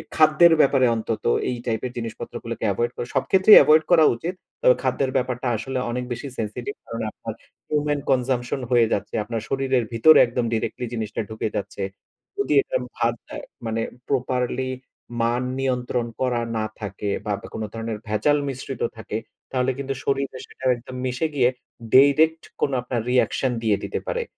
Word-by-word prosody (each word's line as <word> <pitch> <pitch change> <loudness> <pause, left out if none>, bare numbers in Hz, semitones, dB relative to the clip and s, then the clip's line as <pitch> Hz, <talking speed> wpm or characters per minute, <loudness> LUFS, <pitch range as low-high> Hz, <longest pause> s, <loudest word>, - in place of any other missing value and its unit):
খাদ্যের 160 +2 +6
ব্যাপারে 135 -2 +4
অন্তত, 110 0 -3 0.3
এই 125 - -1
টাইপের 120 +1 -2
জিনিসপত্রগুলোকে 115 -1 -6
এভয়েড 120 0 -1
করা। 120 - -4
সব - - +3
ক্ষেত্রেই 190 +2 +8
এভয়েড 155 +1 +5
করা 165 -2 +7
উচিত। 170 +10 -4 0.3
তবে - - +6
খাদ্যের 135 -1 0
ব্যাপারটা 125 0 -2
আসলে 130 +3 -4
অনেক 125 +1 -2
বেশি 120 +4 -4
সেনসিটিভ, 115 - -4
কারণ - - -5
আপনার - - -7 0.3
হিউমেন 150 -1 0
কনজাম্পশন 125 0 0
হয়ে 120 -2 +5
যাচ্ছে। 100 - -3
আপনার 115 0 -4
শরীরের 135 -2 +1
ভিতরে 155 +8 +7
একদম 120 0 -1
ডিরেক্টলি 115 +2 -2
জিনিসটা 110 -1 -3
ঢুকে 110 0 -3
যাচ্ছে। 100 0 -4 0.5
যদি 405 - 0
এটা - - -2 0.2
ভার - - +1
দেয়, - - -7 0.2
মানে 115 0 -1 0.3
প্রপারলি 130 -1 -1 0.5
মান 120 +2 +1 0.2
নিয়ন্ত্রণ 125 -2 -1 0.2
করা 125 -2 +1 0.2
না 110 - 0
থাকে, 100 0 -4 0.2
বা 105 - 0
দ - - -28
কোন 110 - -5
ধরনের 115 -1 -4
ভেজাল 110 +8 +2
মিশ্রিত 130 -1 -5 0.2
থাকে, 110 0 -4 0.3
তাহলে 130 0 +1
কিন্তু 135 0 -3
শরীরে 135 -1 -1
সেটা 130 - -11
একদম 125 +2 -10
মিশে 125 +5 0
গিয়ে, 125 -2 +4 0.5
ডাইরেক্ট 155 +4 +5 0.2
কোন 140 - +2
আপনার 120 -2 -2
রিঅ্যাকশন, 125 +1 +2
দিয়ে 105 -3 +3
দিতে - - -3
পারে। 485 -1 -1
125 Hz, 160 wpm, -23 LUFS, 115-140 Hz, 0.5 s, ক্ষেত্রেই